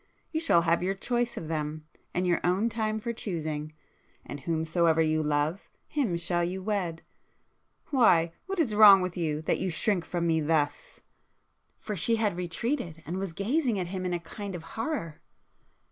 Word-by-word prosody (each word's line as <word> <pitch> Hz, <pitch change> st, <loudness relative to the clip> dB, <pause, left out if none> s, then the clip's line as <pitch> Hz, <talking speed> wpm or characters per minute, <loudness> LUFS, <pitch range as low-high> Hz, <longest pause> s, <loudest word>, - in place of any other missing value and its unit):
You 315 Hz, -, 0 dB
shall 170 Hz, -, +4 dB
have 170 Hz, 0 st, +2 dB
your 190 Hz, +2 st, 0 dB
choice 240 Hz, +4 st, -1 dB
of 160 Hz, -, -5 dB
them, 155 Hz, -1 st, -3 dB, 0.3 s
and 180 Hz, -, -1 dB
your 175 Hz, -1 st, +2 dB
own 190 Hz, +6 st, +2 dB
time 220 Hz, -1 st, -1 dB
for 235 Hz, +2 st, -3 dB
choosing,—and 155 Hz, -6 st, -6 dB
whomsoever 165 Hz, +2 st, +1 dB
you 155 Hz, -1 st, +2 dB
love, 150 Hz, +4 st, -1 dB, 0.2 s
him 275 Hz, -, 0 dB
you -, -, 0 dB
shall 175 Hz, +1 st, -1 dB
wed,... 185 Hz, -5 st, -2 dB, 0.9 s
why—what 235 Hz, -, +2 dB
is 260 Hz, -10 st, +2 dB
wrong 205 Hz, -2 st, +9 dB
with 185 Hz, -1 st, -3 dB
you 155 Hz, -3 st, -2 dB
that -, -, 0 dB
you 190 Hz, -, -1 dB
shrink 180 Hz, +2 st, +1 dB
from 170 Hz, -1 st, -2 dB
me 160 Hz, -1 st, +2 dB
thus?" 150 Hz, -1 st, -1 dB, 0.8 s
For 210 Hz, -, -5 dB
she 230 Hz, +6 st, +1 dB
had 215 Hz, -5 st, 0 dB
retreated, 175 Hz, -, -3 dB
and 175 Hz, +3 st, -4 dB
was 190 Hz, -2 st, -3 dB
gazing 235 Hz, -, 0 dB
at 180 Hz, -2 st, -2 dB
him 185 Hz, -1 st, -3 dB
in 180 Hz, -1 st, -1 dB
a -, -, -2 dB
kind 195 Hz, +3 st, -7 dB
of 165 Hz, -, -7 dB
horror. 225 Hz, -, -3 dB
175 Hz, 170 wpm, -28 LUFS, 160-215 Hz, 0.9 s, wrong